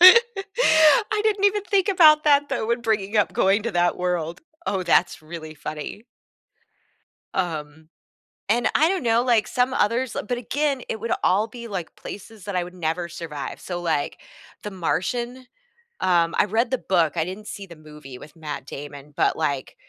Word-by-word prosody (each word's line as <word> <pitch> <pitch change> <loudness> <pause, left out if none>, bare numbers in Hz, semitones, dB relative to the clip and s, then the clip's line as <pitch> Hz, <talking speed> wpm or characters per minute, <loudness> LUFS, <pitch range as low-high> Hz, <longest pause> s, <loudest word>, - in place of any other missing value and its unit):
I 415 -1 +5
didn't 420 -2 +1
even 410 0 +3
think 400 -2 +1
about 310 -6 +6
that 290 -1 +4
though - - -2
when 235 +1 +1
bringing 215 -2 -1
up 210 - +2
going 195 +3 +3
to 235 - -1
that 175 -1 +2
world. 175 -1 -2 0.3
Oh, 190 -2 0
that's 175 -3 +2
really 155 0 -8
funny. 150 +8 -7 1.3
Um, 155 -3 -3 0.6
and 240 +3 +3
I 315 - +5
don't 375 -5 -1
know, 230 0 +3
like 235 -4 +3
some 250 0 +1
others 235 +2 0
uh, - - -2
but 245 +4 -2
again, 275 +3 -1
it 220 - -3
would 230 +2 -4
all 200 +4 +3
be, 235 +1 -9
like, 185 -6 -5
places 205 +1 -10
that 200 -2 -4
I 180 - +1
would 180 +1 -10
never 170 0 -2
survive, 165 -4 -6
so, 175 -1 -5
like, 160 -4 -1 0.4
The 210 - -5
Martian, 240 +8 -2 0.5
um, 170 -2 +2
I - - +5
read 225 +5 0
the 260 - +2
book, 170 -5 +1
I 160 - +2
didn't 195 +4 -7
see 200 -1 -7
the 170 - -12
movie 150 -4 -12
with 150 +5 -13
Matt 150 -4 -6
Damon, 145 +1 -9
but, - - +2
like, 140 -4 -2
200 Hz, 180 wpm, -23 LUFS, 165-255 Hz, 1.3 s, about